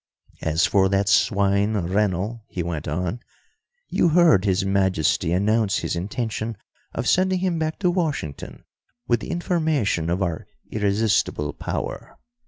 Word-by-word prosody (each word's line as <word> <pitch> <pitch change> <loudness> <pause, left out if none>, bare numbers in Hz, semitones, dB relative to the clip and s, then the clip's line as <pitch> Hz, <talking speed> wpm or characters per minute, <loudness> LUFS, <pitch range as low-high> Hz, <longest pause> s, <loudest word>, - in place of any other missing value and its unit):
"As 80 +1 +2
for 95 -2 +3
that 100 0 +1
swine 100 +1 +2
Rennell," 100 +4 -1
he 90 - -4
went 80 -3 -4
on, 90 +6 -2 0.7
"you 175 - +2
heard 160 - +5
His 95 0 +1
Majesty 95 -5 +1
announce 105 +3 +2
his - - -2
intention 110 +4 -3 0.4
of - - -2
sending 185 0 +3
him 180 -2 -1
back 155 0 -2
to 180 -2 +3
Washington 155 - -3 0.4
with 120 -1 +2
the - - -8
information 155 - 0
of 90 +3 0
our 85 -3 -3 0.2
irresistible 100 -8 0
power. - - -5
100 Hz, 135 wpm, -23 LUFS, 90-120 Hz, 0.7 s, heard